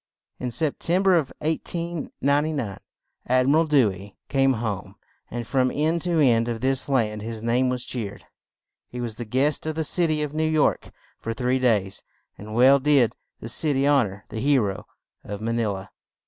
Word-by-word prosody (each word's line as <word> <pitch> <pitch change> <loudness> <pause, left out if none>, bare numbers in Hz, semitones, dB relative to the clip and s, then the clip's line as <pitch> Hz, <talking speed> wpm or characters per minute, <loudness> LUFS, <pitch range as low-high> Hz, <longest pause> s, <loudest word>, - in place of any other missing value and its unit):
In 125 - -3
Sep 140 +5 -1
tem 180 +3 +1
ber 190 -1 +5
of 160 -6 +1
1899 150 - -1 0.5
Ad 130 +1 +3
mi 140 - +4
ral 160 +1 +3
Dew 135 -9 +4
ey 95 +2 -11
came 135 -1 +3
home; 110 -5 -4 0.3
and 120 0 -5
from 130 +1 +1
end 160 +5 0
to 175 0 0
end 120 -5 +3
of 115 -1 -3
this 130 +2 +1
land 110 -6 0
his 110 0 -6
name 125 +2 +2
was 125 -1 -3
cheered. 110 -6 -6 0.6
He 125 - -7
was 120 -2 -4
the 120 - -5
guest 135 +7 0
of 155 - -2
the 160 - -1
cit 170 +2 +3
y 155 -1 0
of 150 -1 -5
New 155 0 0
York 155 -2 +1 0.3
for 115 0 -4
three 125 +2 0
days; 105 -6 +1 0.3
and 110 +2 -9
well 130 +3 +6
did 135 -5 +3 0.3
the - - -6
cit 150 -3 +2
y 135 - +1
hon 140 -5 +4
or 100 +1 -11
the 110 - -5
he 140 +3 +3
ro 105 -2 -2 0.4
of 100 0 -6
Ma 115 +2 -2
ni 115 -1 0
la. 95 -2 -5
130 Hz, 200 wpm, -24 LUFS, 115-150 Hz, 0.6 s, well